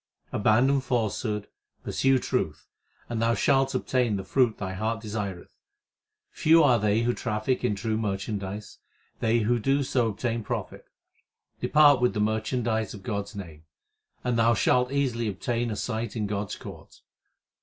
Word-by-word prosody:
Abandon 125 +6 +3
falsehood, 110 -4 -1 0.4
pursue 135 0 +2
truth, - - -2 0.4
And 115 -2 -3
thou 115 +1 +2
shalt 135 -1 +2
obtain 125 -4 +1
the 95 - -3
fruit 120 +2 +2
thy 95 -2 -4
heart 110 +4 -2
desireth. 105 -4 -5 0.8
Few 165 +1 +5
are 125 -5 +5
they 105 +2 +2
who 120 +1 +1
traffic 120 +3 -2
in 120 -4 +1
true 110 +2 -2
merchandise; 100 0 -4 0.4
they 115 +1 +2
who 120 +3 +1
do 135 +5 +1
so 125 -3 +1
obtain 115 +2 -2
profit. - - -5 0.7
Depart 145 -4 +5
with 125 - +2
the - - -1
merchandise 110 0 -1
of 100 - -12
God 100 -3 -2
s 105 +1 -13
name, 80 -6 -9 0.6
And 125 -2 0
thou 115 +1 +4
shalt 125 +4 +2
easily 125 -5 0
obtain 115 +4 -2
a 110 - -3
sight 110 +1 -3
of 110 -2 -1
God 100 0 -2
s - - -5
court. - - -12
115 Hz, 155 wpm, -27 LUFS, 105-125 Hz, 0.8 s, Few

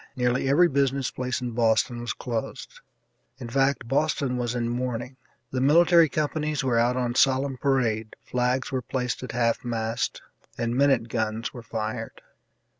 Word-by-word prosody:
Nearly 125 +1 +1
every 170 +6 +5
business 140 -3 0
place 125 0 -3
in 125 -1 -3
Boston 115 +1 +1
was 120 - -3
closed 115 -2 -5 0.6
in 125 -3 -7
fact, 135 0 +1
Boston 140 -1 0
was 120 -1 -2
in 120 -1 -1
mourning; 125 +1 -3 0.4
the 130 - -1
military 165 +3 +5
companies 150 0 -1
were 120 -3 +2
out 120 +2 +2
on 120 -1 -1
solemn 135 +1 +2
parade, 115 -6 0
flags 125 +1 0
were 130 -1 -1
placed 125 0 -3
at 130 - -6
half 115 -1 +1
mast, 115 0 -2 0.3
and 120 0 -1
minute 135 -3 +3
guns 110 -1 -2
were 120 - -8
fired. 110 0 -5
125 Hz, 155 wpm, -26 LUFS, 115-135 Hz, 0.6 s, every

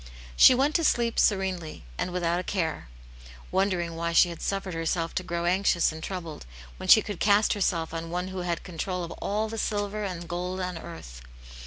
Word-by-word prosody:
She 255 - +8
went 280 +4 +2
to 335 - -2
sleep 235 -6 +2
serenely, 190 - 0
and - - -2
without 175 -1 0
a - - -3
care: 165 - -2 0.6
wondering 185 -3 0
why 170 0 -2
she 175 +1 +6
had 170 - -8
suffered 195 -2 -2
herself 165 0 -1
to - - -1
grow 170 -1 -3
anxious 180 -1 +2
and 160 0 -8
troubled, 165 - -6 0.3
when - - -6
she 220 - +8
could 205 -5 -6
cast 205 +1 +4
herself 170 -5 -1
on 165 0 -4
One 180 +2 -3
who 190 0 -5
had 175 -2 -2
control 180 +1 -4
of 170 - -6
all 210 +2 -1
the 225 0 -5
silver 205 0 -2
and 180 -4 -4
the - - -12
gold 180 +2 -3
on 180 -1 -3
earth. 65 - -10
180 Hz, 200 wpm, -27 LUFS, 170-200 Hz, 0.6 s, She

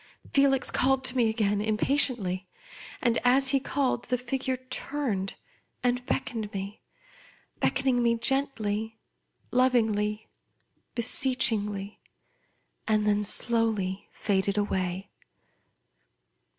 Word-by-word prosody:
Felix 275 -2 +3
called 265 0 +2
to 260 -1 +2
me 235 -3 +3
again, 210 -2 0
im 215 0 0
patiently; 215 -9 +1 0.6
and, 235 -2 +2
as 260 +2 +4
he 275 0 +3
called, 265 -2 -1
the 250 - 0
figure 260 +1 -2
turned, 255 -5 -3 0.5
and 250 0 +1
beckoned 230 -6 -2
me; 195 +2 -6 0.8
beckoning 260 -2 +1
me 235 -1 +3
gentl}^, 225 -4 0 0.6
lov 255 +1 +3
ingly, 215 -2 0 0.7
beseechingly; 220 -5 +2 0.9
and 215 -1 +2
then 210 0 +2
slowly 215 -3 0
faded 200 0 0
away. 190 -2 -2
230 Hz, 100 wpm, -27 LUFS, 205-255 Hz, 0.9 s, as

